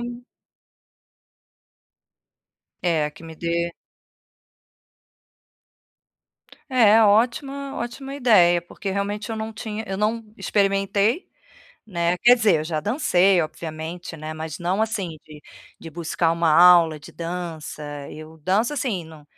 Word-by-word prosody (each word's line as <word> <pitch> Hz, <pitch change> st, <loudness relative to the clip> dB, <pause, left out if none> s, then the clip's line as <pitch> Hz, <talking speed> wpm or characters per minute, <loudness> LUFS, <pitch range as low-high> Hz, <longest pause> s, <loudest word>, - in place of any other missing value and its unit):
um 240 Hz, 0 st, -7 dB, 2.6 s
É, 160 Hz, -4 st, +1 dB
que 150 Hz, -, -17 dB
me 160 Hz, 0 st, -9 dB
dê 170 Hz, +1 st, -2 dB, 3.0 s
É, 225 Hz, -3 st, +6 dB
ótima 260 Hz, +6 st, +1 dB
ótima 265 Hz, +3 st, -6 dB
ideia. 195 Hz, -10 st, +4 dB
Porque 195 Hz, +3 st, -6 dB
realmente 200 Hz, +2 st, -3 dB
eu 225 Hz, -, -3 dB
não 220 Hz, 0 st, -5 dB
tinha 215 Hz, 0 st, -6 dB
eu 195 Hz, -, -4 dB
não 220 Hz, +2 st, 0 dB
experimentei, 200 Hz, -, +1 dB, 0.6 s
né? 170 Hz, -3 st, 0 dB
Quer 240 Hz, +6 st, +6 dB
dizer, 210 Hz, -7 st, +3 dB
eu -, -, -4 dB
já 155 Hz, -1 st, -2 dB
dancei, 195 Hz, -, +3 dB
obviamente, 160 Hz, +2 st, -7 dB
né, 155 Hz, 0 st, -6 dB
mas 155 Hz, -1 st, -6 dB
não 180 Hz, +4 st, -1 dB
assim 205 Hz, -7 st, -2 dB
de 150 Hz, -1 st, -13 dB, 0.4 s
de 165 Hz, -, -9 dB
buscar 165 Hz, +1 st, -1 dB
uma 165 Hz, 0 st, +1 dB
aula 170 Hz, -2 st, +6 dB
de -, -, -12 dB
dança. 170 Hz, -3 st, -6 dB, 0.3 s
Eu 155 Hz, +1 st, -11 dB
danço 200 Hz, -, +1 dB
assim, 240 Hz, -, -2 dB
num 160 Hz, -2 st, -14 dB
185 Hz, 120 wpm, -23 LUFS, 165-220 Hz, 3.0 s, É